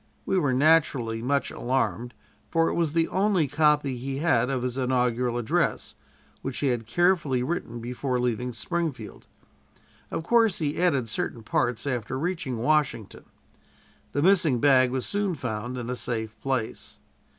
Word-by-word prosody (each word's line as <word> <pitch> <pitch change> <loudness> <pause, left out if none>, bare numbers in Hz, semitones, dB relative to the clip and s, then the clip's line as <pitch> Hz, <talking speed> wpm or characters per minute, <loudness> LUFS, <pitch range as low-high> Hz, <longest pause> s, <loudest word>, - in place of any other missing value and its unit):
We 190 - +1
were 145 -6 +1
naturally 130 -5 +2
much 140 +3 0
alarmed, 125 -1 -2 0.3
for 165 0 +2
it - - -2
was 165 -3 0
the 165 0 +2
only 190 -5 +2
copy 150 -2 +2
he 135 +2 -4
had 135 -6 +2
of 130 -2 -1
his 125 -1 -2
inaugural 125 -2 0
address, 120 -2 -1 0.5
which 135 -2 -4
he 140 - +1
had 120 -3 -2
carefully 160 -2 +2
written 125 -5 -3
before 125 +2 -2
leaving 125 0 -1
Springfield. 135 - -4 0.8
Of - - -3
course, 225 +1 +3
he 150 +1 -2
added 140 -10 +2
certain 115 +1 -3
parts 120 +2 -1
after 125 -2 -2
reaching 160 -5 -2
Washington. 125 -4 0 0.9
The 145 - 0
missing 165 -9 +4
bag 130 -1 +5
was 130 0 -2
soon 200 -3 -1
found 125 -1 -4
in 120 -2 -5
a 125 - -2
safe 110 -3 -3
place. 130 -5 -3
130 Hz, 150 wpm, -26 LUFS, 120-160 Hz, 0.9 s, bag